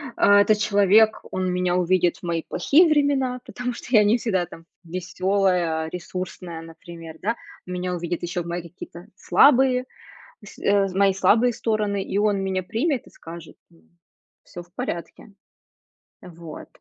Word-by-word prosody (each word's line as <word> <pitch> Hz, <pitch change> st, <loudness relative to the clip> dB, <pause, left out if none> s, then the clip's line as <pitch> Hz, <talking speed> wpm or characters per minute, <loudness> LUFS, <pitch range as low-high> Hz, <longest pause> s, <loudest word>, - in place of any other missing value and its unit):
а, 205 Hz, 0 st, +5 dB
этот 210 Hz, +1 st, +3 dB
человек, 210 Hz, +1 st, +3 dB
он 185 Hz, -1 st, -1 dB
меня 180 Hz, -1 st, 0 dB
увидит 180 Hz, -1 st, +1 dB
в -, -, -23 dB
мои 170 Hz, -1 st, -2 dB
плохие 325 Hz, -, +3 dB
времена, 280 Hz, -4 st, +1 dB
потому 250 Hz, 0 st, -5 dB
что -, -, -10 dB
я 215 Hz, -4 st, +6 dB
не 210 Hz, +3 st, +3 dB
всегда, 190 Hz, -7 st, -1 dB
там, 165 Hz, -1 st, -13 dB, 0.2 s
весёлая, 180 Hz, -2 st, -1 dB
ресурсная, 180 Hz, -1 st, -7 dB
например, 165 Hz, 0 st, -11 dB
да. 230 Hz, +4 st, -1 dB, 0.3 s
Меня 180 Hz, 0 st, -3 dB
увидит 175 Hz, -1 st, -4 dB
ещё 175 Hz, +1 st, -3 dB
в 170 Hz, -, -8 dB
мои 170 Hz, 0 st, -4 dB
какие-то 170 Hz, 0 st, -11 dB
слабые 255 Hz, -2 st, +4 dB, 0.6 s
с -, -, -14 dB
э 200 Hz, -1 st, +2 dB
з 185 Hz, -, -8 dB
мои 195 Hz, 0 st, +3 dB
слабые 230 Hz, +5 st, +3 dB
стороны, 215 Hz, -3 st, -1 dB
и 195 Hz, -, -3 dB
он 205 Hz, -1 st, +1 dB
меня 190 Hz, -1 st, -2 dB
примет 245 Hz, -, -1 dB
и -, -, -14 dB
скажет: 165 Hz, -1 st, -12 dB
"Ну, 80 Hz, -1 st, -25 dB, 0.6 s
всё 175 Hz, -, -10 dB
в 175 Hz, 0 st, -28 dB
порядке". 200 Hz, -2 st, -6 dB, 0.9 s
Э, 180 Hz, -, -12 dB
вот. 165 Hz, -2 st, -10 dB
185 Hz, 160 wpm, -23 LUFS, 175-215 Hz, 0.9 s, я